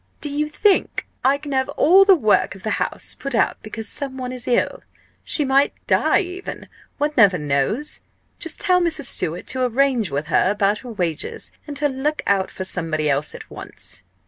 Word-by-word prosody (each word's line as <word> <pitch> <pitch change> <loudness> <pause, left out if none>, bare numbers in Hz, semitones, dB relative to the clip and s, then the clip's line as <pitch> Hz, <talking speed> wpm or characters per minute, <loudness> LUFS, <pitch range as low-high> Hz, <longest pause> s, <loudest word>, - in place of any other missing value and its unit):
"Do 295 - -1
you 300 +1 -1
think 395 +6 +1 0.2
I 270 +2 +4
can 285 0 -8
have 265 -1 0
all 375 +6 +6
the 390 -1 +7
work 215 - +2
of 190 - -13
the 220 - -2
house - - -3
put 275 -3 -3
out - - +1
because 220 0 -6
some 270 -2 -4
one 255 -1 -4
is 250 -2 -5
ill? 245 - +1 0.4
She 300 - +4
might 275 +1 +3
die - - +3
even 365 0 -7 0.3
one 295 +1 0
never 200 -6 +5
knows. 150 - -1 0.4
Just 330 - 0
tell 365 -3 +3
Mrs. 330 -4 -1
Stewart 170 -7 -1
to 260 -1 -1
arrange 250 -4 +1
with 145 +2 -2
her 155 - +2
about 205 0 +1
her 245 - -9
wages, 175 -7 -3 0.2
and 290 -1 -4
to 290 +1 +2
look 290 +3 -2
out 195 -1 +1
for 190 - -6
somebody 160 -5 -1
else 140 +2 -1
at - - -10
once." - - -7
255 Hz, 195 wpm, -21 LUFS, 195-295 Hz, 0.4 s, the